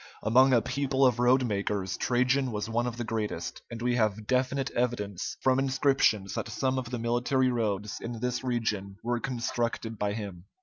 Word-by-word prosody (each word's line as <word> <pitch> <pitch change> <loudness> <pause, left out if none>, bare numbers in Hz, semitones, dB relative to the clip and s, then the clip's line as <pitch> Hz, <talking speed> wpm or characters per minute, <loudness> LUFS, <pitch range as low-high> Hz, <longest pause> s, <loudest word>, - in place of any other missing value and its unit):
Among 130 +4 +5
a 120 -3 +4
people 135 -1 +1
of 125 -3 +3
roadmakers, 105 -6 +1
Trajan 125 +1 +1
was 105 -1 -3
one 120 +2 0
of 120 -1 -4
the 120 - -2
greatest, 110 -6 -3
and 115 0 -6
we 125 0 +1
have 110 -2 0
definite 130 +2 0
evidence 105 -6 -2
from 130 0 +4
inscriptions 130 -7 +2
that - - -3
some 130 +4 0
of 125 -2 -6
the 125 - -3
military 120 +3 +1
roads 105 -3 -2
in 115 -1 -5
this 125 +1 -2
region 110 -6 -2
were 120 +1 0
constructed 115 -3 -2
by 105 0 0
him. 100 -5 -6
120 Hz, 175 wpm, -29 LUFS, 105-130 Hz, -, Among